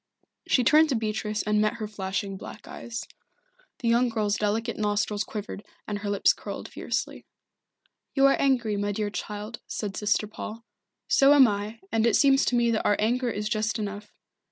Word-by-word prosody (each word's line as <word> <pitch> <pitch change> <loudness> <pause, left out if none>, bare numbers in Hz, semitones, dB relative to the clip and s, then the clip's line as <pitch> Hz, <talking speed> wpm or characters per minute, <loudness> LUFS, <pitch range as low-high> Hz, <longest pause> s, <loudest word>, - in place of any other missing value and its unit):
She 255 - +3
turned 305 +5 +5
to 270 - +1
Beatrice 215 -1 -2
and 210 0 +2
met 215 +2 +1
her 220 -3 -5
flashing 195 -1 -3
black 190 - -10
eyes. 235 -1 -6 0.7
The 240 - -3
young 240 +2 +3
girl's 210 -3 0
delicate 220 +3 -1
nostrils 210 0 0
quivered 210 -1 -6 0.2
and 205 -1 -3
her 205 0 -4
lips 200 -1 +3
curled - - -7
fiercely. - - -4 0.9
"You 275 -1 +5
are 275 - +6
angry, 240 -6 +2
my 205 0 -1
dear 210 0 -2
child," 210 +2 -6
said 205 -3 -4
Sister 210 0 +1
Paul. 215 +2 -8 0.4
"So 280 +1 +6
am 270 -3 +8
I, 210 +2 -4
and 225 +1 +2
it 230 - +3
seems 275 -1 +4
to 245 - +1
me 235 -1 +3
that 220 - 0
our 205 - +3
anger 245 +3 +1
is 210 -1 -3
just 215 0 -1
enough. 205 0 -5
215 Hz, 180 wpm, -26 LUFS, 205-235 Hz, 0.9 s, am